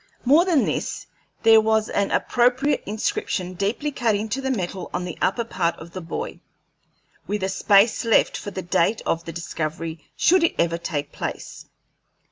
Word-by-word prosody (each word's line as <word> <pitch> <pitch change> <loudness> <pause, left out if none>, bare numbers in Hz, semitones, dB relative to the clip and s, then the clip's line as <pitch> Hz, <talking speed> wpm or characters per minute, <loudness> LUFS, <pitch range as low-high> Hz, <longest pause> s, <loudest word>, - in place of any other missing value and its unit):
More 300 +7 +5
than 335 -7 +3
this, - - -3 0.4
there 225 -1 +7
was 220 0 +2
an 200 -1 0
appropriate 250 +4 +2
inscription 195 -3 -2
deeply 210 +11 -2
cut 235 -6 +1
into 220 +6 -2
the 265 - -2
metal 190 -6 -3
on 180 0 -2
the 175 - -5
upper 235 - +1
part 175 -7 -1
of 165 +1 -11
the 185 - -6
buoy, 450 - -6 0.9
with 205 -1 -2
a 190 - 0
space 200 +4 +3
left 230 -2 +3
for - - -5
the 190 -2 -6
date 175 +5 +1
of 165 0 -1
the 165 - -5
discovery, 160 -1 -5
should 365 0 +4
it 335 - +2
ever 170 0 +1
take 145 -4 -4
place. - - -6
205 Hz, 170 wpm, -23 LUFS, 175-240 Hz, 0.9 s, there